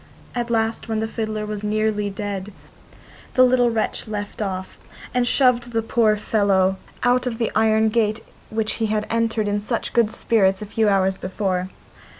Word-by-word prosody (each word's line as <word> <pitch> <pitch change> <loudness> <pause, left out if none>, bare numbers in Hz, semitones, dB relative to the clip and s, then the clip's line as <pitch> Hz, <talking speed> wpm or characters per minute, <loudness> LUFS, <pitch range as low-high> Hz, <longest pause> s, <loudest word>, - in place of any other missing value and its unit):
At 240 -1 -2
last, 225 -1 0
when 220 - 0
the 220 +1 -1
fiddler 215 -1 -3
was 210 -1 -5
nearly 210 -1 0
dead, 200 0 -5 0.8
the 255 - +7
little 250 -1 +4
wretch 225 -1 -2
left 205 0 -5
off, 190 -2 -4 0.3
and 250 -1 +1
shoved 245 -2 +2
the 225 0 +1
poor 220 -1 +2
fellow 195 -3 +2 0.3
out 250 +1 +3
of 230 -2 -3
the 230 -1 -1
iron 220 0 +3
gate 215 -1 +1 0.3
which 220 0 -1
he 220 - +2
had 215 0 -1
entered 225 -2 0
in 205 0 0
such 225 +3 -3
good 235 -3 +3
spirits 195 -5 +2
a 210 - -5
few 215 +1 +1
hours 190 -1 +2
before. 185 -1 -2
215 Hz, 170 wpm, -22 LUFS, 205-230 Hz, 0.8 s, the